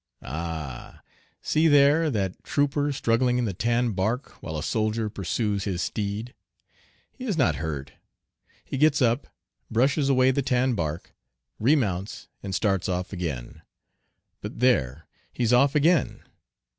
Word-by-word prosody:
Ah! 80 -4 -6 0.4
See 155 +1 +2
there 145 +2 +5
that 100 -7 -2
trooper 145 0 0
struggling 125 -1 +1
in 125 - 0
the 100 - -2
tan 120 +4 +1
bark 110 +7 -1
while 80 - -5
a 75 - -4
soldier 110 +1 -1
pursues 100 +1 -2
his 95 -4 -2
steed. 105 +3 -3 0.8
He 260 - -8
is 205 -9 -1
not 135 - +2
hurt. 70 -4 -4 0.7
He 135 - -4
gets 150 -1 +4
up, 120 +1 +1 0.4
brushes 135 +5 +2
away 130 -1 +4
the 140 - 0
tan 125 0 +1
bark, 80 -4 -4 0.5
remounts 105 - 0
and 95 -2 -4
starts 95 -1 0
off 90 +1 -3
again. 80 -10 -5 0.8
But - - -7
there, 80 - +2 0.3
he's 120 -1 0
off 135 +4 +4
again! 160 +3 +2
115 Hz, 135 wpm, -26 LUFS, 95-135 Hz, 0.8 s, there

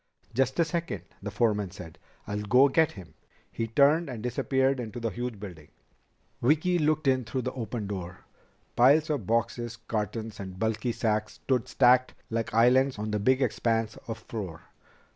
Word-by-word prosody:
"Just 130 +3 +1
a 170 - +5
second," 165 - -3 0.2
the 105 - -4
foreman 105 -2 +1
said. 85 -2 -11 0.3
"I'll 105 0 -3
go 125 +7 +5
get 160 +2 +3
him." 95 -5 -12 0.4
He 115 - -3
turned 145 +7 +3
and 115 -4 -6
disappeared 130 +2 +1
into 120 0 -5
the 115 -1 -2
huge 120 +1 -5
building. 85 -7 -9 0.7
Vicki 160 +7 +3
looked 155 0 +1
in 130 -1 +3
through 120 +3 -3
the 130 - -3
open 115 -3 -4
door. 90 -3 -6 0.5
Piles 145 +6 +5
of 130 -11 -2
boxes, 115 +1 -1
cartons, 110 -1 -4
and 95 -2 -7
bulky 110 +3 -1
sacks 110 -2 -1
stood 130 -4 -1
stacked 125 0 +4 0.2
like 115 0 -2
islands 125 +3 +4
on 105 +1 -3
the 105 - 0
big 130 +6 +3
expanse 115 -2 0
of 115 -1 -4
floor. 105 -7 -7
115 Hz, 165 wpm, -28 LUFS, 105-130 Hz, 0.7 s, a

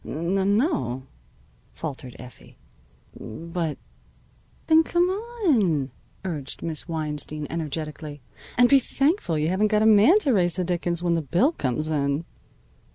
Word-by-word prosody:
"N 190 +5 0
no," 130 - -1 0.7
faltered 135 -5 -7
Effie, 125 +1 -14 0.6
"but 165 +6 -5 0.4
" - - -34
"Then 320 0 +6
come 345 +2 +1
on," 300 - 0 0.3
urged 150 -7 -3
Miss 160 -1 -4
Weinstein 150 -2 -3
energetically. 155 -2 -4 0.4
"And 245 0 +6
be 275 +2 +6
thankful 275 - 0
you 155 +1 0
haven't 195 +4 +2
got 210 0 +2
a - - +3
man 220 - +6
to 275 -8 +2
raise 175 -4 +3
the 185 - -1
dickens 175 -1 -1
when 170 -1 +2
the 165 - +1
bill 175 - +2
comes 155 - -2
in." 140 +1 0
170 Hz, 140 wpm, -24 LUFS, 150-215 Hz, 0.7 s, Then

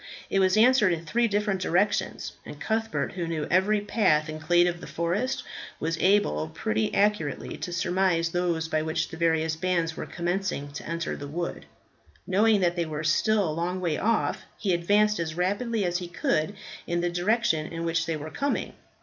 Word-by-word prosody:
It 195 - +3
was 190 +1 +3
answered 225 -4 +5
in 165 0 -5
three 235 +8 +2
different 205 -2 0
directions, 185 +4 0
and - - -10
Cuthbert, 225 0 -1
who 175 -3 -4
knew 160 -3 -2
every 200 +4 +3
path 155 -8 +2
and 155 0 -6
glade 175 +3 +4
of 175 -1 -2
the - - -8
forest, 180 +10 -1 0.4
was 165 +1 -1
able 130 - +2
pretty 110 +5 -1
accurately 200 -8 0
to 175 - -5
surmise 175 -1 +1
those 170 -2 -1
by 155 -1 0
which 160 0 -1
the 160 - -8
various 160 -1 +1
bands 170 -1 0
were - - -5
commencing 175 -4 -2
to 145 - -7
enter 170 0 -2
the 145 - -7
wood. 170 +4 -4 0.6
Knowing 205 +2 +3
that 175 -1 +2
they 170 -2 -1
were 155 0 -4
still 200 +5 +2
a 155 - -2
long 175 +3 -2
way 170 -4 0
off, 230 +8 0 0.2
he 195 -3 0
advanced 205 +4 +2
as 160 -2 -3
rapidly 205 +4 0
as 175 0 0
he 180 - -6
could 170 +1 -1 0.3
in 175 0 0
the 175 - +1
direction 175 -3 +1
in 165 0 -4
which 165 0 0
they 165 -2 -1
were 155 +1 -7
coming. 280 0 -2
175 Hz, 190 wpm, -27 LUFS, 160-200 Hz, 0.6 s, answered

